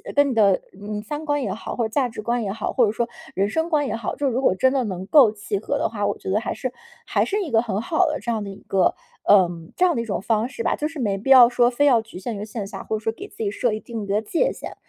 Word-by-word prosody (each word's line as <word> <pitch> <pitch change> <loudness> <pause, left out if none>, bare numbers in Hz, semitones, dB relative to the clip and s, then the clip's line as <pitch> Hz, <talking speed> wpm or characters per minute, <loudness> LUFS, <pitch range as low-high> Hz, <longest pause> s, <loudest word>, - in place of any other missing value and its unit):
跟 285 0 +4
你 255 - -1
的 200 -4 +4 0.2
嗯， 210 +1 -5
三 295 +8 -6
观 290 -1 0
也 - - -2
好， - - -6
或 235 - 0
者 - - -3
价 255 +1 0
值 220 - -7
观 235 +2 -1
也 195 - -2
好， 215 +1 -3
或 245 - +4
者 205 - +1
说 235 +2 -1 0.3
人 200 +2 +1
生 320 +6 -1
观 295 -4 +1
也 - - -2
好， 225 -1 -4
就 285 - -1
是 255 - 0
如 255 - 0
果 265 - +3
真 260 +7 +2
的 265 -2 +1
能 185 -3 -4
够 260 -4 +6
契 210 -1 -4
合 250 +8 -2
的 285 - +1
话， 205 -2 -2
我 205 - -1
觉 - - -7
得 200 +3 +2
还 230 - -3
是 255 -3 -4 0.3
还 - - +1
是 415 +1 -1
一 345 - -4
个 225 0 +4
很 215 -3 -2
好 330 +9 +2
的， 305 - -2
这 235 - -6
样 220 -2 -2
的 200 - -6
一 195 - -10
个， 190 -1 +2 0.3
呃， 190 -4 +5 0.3
这 365 - +4
样 350 - +2
的 235 - 0
一 - - -5
种 200 -4 -3
方 220 +2 +1
式 250 - -7
吧。 - - +1
就 300 - -2
是 320 -3 -8
没 205 -5 0
必 215 +7 -5
要 255 -3 +9
说 240 0 +3
非 270 +4 +1
要 245 -5 +5
局 220 -4 -11
限 220 +3 -4
于 205 - -5
线 210 -1 -5
下， - - -8
或 220 - -2
者 - - -6
说 225 - 0
给 - - -9
自 - - -20
己 210 -3 -1
设 230 +3 0
一 215 - -2
定 225 -2 -6
的 200 +2 0
界 340 - 0
限。 - - -8
230 Hz, 345 characters per minute, -23 LUFS, 210-270 Hz, 0.3 s, 要